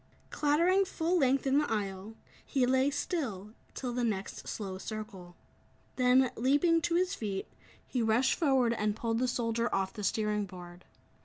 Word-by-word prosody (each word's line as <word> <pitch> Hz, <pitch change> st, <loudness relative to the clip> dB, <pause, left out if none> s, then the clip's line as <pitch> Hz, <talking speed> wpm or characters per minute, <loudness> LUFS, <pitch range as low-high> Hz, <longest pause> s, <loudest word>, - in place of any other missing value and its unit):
Clattering 340 Hz, +6 st, +3 dB
full 355 Hz, -1 st, 0 dB
length 270 Hz, -1 st, +2 dB
in 270 Hz, +1 st, +3 dB
the 295 Hz, -, -1 dB
aisle, 200 Hz, 0 st, -3 dB, 0.3 s
he 265 Hz, -3 st, +1 dB
lay 260 Hz, +2 st, +3 dB
still, 250 Hz, -, -3 dB, 0.2 s
till 250 Hz, -2 st, -4 dB
the 245 Hz, 0 st, -1 dB
next 205 Hz, -4 st, -3 dB
slow 190 Hz, -3 st, -5 dB
circle. 200 Hz, -5 st, -7 dB, 0.6 s
Then, 255 Hz, 0 st, +4 dB
leaping 290 Hz, +7 st, +3 dB
to 335 Hz, +2 st, 0 dB
his 365 Hz, +1 st, +1 dB
feet, 200 Hz, -3 st, -4 dB, 0.4 s
he 250 Hz, -, -2 dB
rushed 230 Hz, +3 st, +3 dB
forward 265 Hz, -7 st, +2 dB
and 210 Hz, -2 st, -1 dB
pulled 225 Hz, 0 st, -1 dB
the 255 Hz, -, +1 dB
soldier 235 Hz, -1 st, -1 dB
off 190 Hz, -1 st, -1 dB
the 210 Hz, -, -7 dB
steering 210 Hz, 0 st, 0 dB
board. 180 Hz, -1 st, -11 dB
235 Hz, 160 wpm, -31 LUFS, 210-275 Hz, 0.6 s, Then